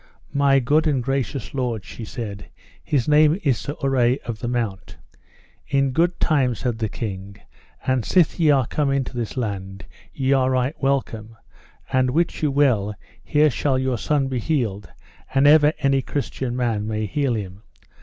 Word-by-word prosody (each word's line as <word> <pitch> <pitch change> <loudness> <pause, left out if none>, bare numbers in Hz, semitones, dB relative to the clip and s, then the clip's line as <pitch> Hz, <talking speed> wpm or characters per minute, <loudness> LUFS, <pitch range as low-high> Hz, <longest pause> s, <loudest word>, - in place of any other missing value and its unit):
My 140 -1 +4
good 150 +6 +2
and 135 -5 +1
gracious 135 -1 -3
lord, 120 -7 -2
she 115 - -8
said, 105 -3 -7 0.3
his 135 -6 0
name 155 +3 +4
is 135 -6 +2
Sir 145 - -5
Urre 130 -2 +2
of 115 -2 -5
the 120 - -4
Mount. 115 -6 -3 0.7
In 135 -1 +1
good 170 +5 +1
time, 135 -6 +2
said 120 -1 -3
the 110 -2 -1
king, 100 -2 -6 0.5
and 130 -2 +1
sith 175 +3 +2
ye 160 -2 +4
are 135 -4 +4
come 145 +3 -1
into 135 -2 -1
this 120 +1 -4
land, 95 -4 -4 0.3
ye 135 0 0
are 130 -1 +2
right 130 +2 0
welcome; 115 -5 -2 0.6
and 130 0 +3
wit 165 +6 0
you 150 - +2
well 125 -8 +2 0.3
here 150 0 +3
shall 135 +1 0
your 130 -2 -1
son 145 +1 0
be 130 -2 -2
healed, 115 -8 -2 0.5
an 135 +1 +4
ever 150 0 +6
any 135 -1 +2
Christian 130 -2 -3
man 115 -4 -1
may 110 0 -2
heal 135 +3 0
him. 100 -2 -6
130 Hz, 170 wpm, -22 LUFS, 115-140 Hz, 0.7 s, ever